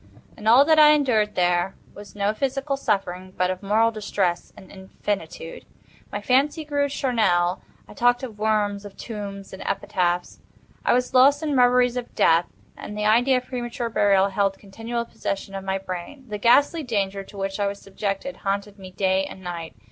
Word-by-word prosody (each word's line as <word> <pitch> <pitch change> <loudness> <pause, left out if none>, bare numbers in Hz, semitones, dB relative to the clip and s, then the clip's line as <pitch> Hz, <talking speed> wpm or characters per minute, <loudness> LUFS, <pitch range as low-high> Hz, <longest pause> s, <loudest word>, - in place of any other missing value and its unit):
In 215 - -7
all 250 +5 +7
that 315 0 +5
I 300 0 +8
endured 230 -8 +1
there 175 +1 +1 0.2
was 205 0 -12
no 205 +1 0
physical 275 +3 -2
suffering 185 -7 -2
but 185 0 +1
of 185 +1 -5
moral 220 +3 +2
distress 200 -5 -2
an 190 - -14
infinitude. 190 -3 -5 0.5
My 205 - -3
fancy 280 +7 +1
grew 285 -1 0
charnel, 210 -10 +1 0.3
I - - -12
talked 245 +1 +2
"of 220 -5 -7
worms, 210 -2 0
of 205 -1 -11
tombs, 200 -4 -7
and 190 - -8
epitaphs." 180 -2 -1 0.4
I - - +3
was 250 +1 0
lost 280 +4 +5
in 295 -2 0
reveries 250 0 +4
of 245 -1 -6
death, 165 +1 +4 0.3
and 210 - -8
the 210 - -1
idea 245 +5 +4
of 250 - -4
premature 240 -1 -4
burial 200 -3 +3
held 195 0 0
continual 225 +4 -5
possession 195 -3 -5
of 195 0 -5
my 190 0 -1
brain. 190 +8 -7
The 210 -2 -5
ghastly 285 +9 +4
Danger 200 -6 -2
to 200 - -14
which 195 +1 -3
I 200 - +1
was 200 0 -4
subjected 195 +6 -4
haunted 200 +1 -3
me 190 -1 -9
day 190 0 +1
and 190 0 -10
night. 170 -2 -6
205 Hz, 180 wpm, -24 LUFS, 195-245 Hz, 0.5 s, I